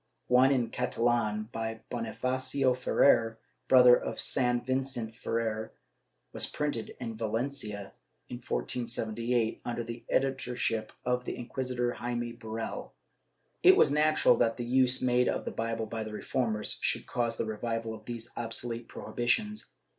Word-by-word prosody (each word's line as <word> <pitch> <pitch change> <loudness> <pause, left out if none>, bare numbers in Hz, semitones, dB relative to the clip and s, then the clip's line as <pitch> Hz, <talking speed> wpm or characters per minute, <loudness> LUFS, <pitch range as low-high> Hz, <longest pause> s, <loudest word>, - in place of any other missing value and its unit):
One 125 +2 +6
in 120 -4 +1
Catalan, 115 -3 0
by 115 0 -4
Bonifacio 130 +3 0
Ferrer, 115 -2 +3 0.3
brother 125 -1 +8
of - - -4
San 125 -1 +1
Vicente 130 -3 -2
Ferrer, 110 -2 -2 0.6
was - - 0
printed 145 -7 -3
in 115 -3 -5
Valencia, 110 -3 -3 0.3
in - - -6
1478, 115 - -1
under 120 0 -3
the 115 +1 -7
editorship 125 -4 0
of 125 0 0
the - - -3
Inquisitor 125 0 -2
Jaime 120 0 -3
Borell.^ 115 -1 -5 0.7
It 375 +1 +8
was - - +5
natural 155 +1 +4
that 115 0 +2
the 120 - -3
use 130 +1 +3
made 125 0 +3
of - - -2
the - - -3
Bible 115 0 -2
by 110 0 -4
the 110 - -7
Reformers 110 -1 -1
should - - 0
cause 120 -2 -1
the - - -1
revival 115 +1 -3
of 110 -1 -11
these 120 -1 -6
obsolete 115 0 -4
prohibitions. 210 - -1
120 Hz, 140 wpm, -30 LUFS, 115-125 Hz, 0.7 s, brother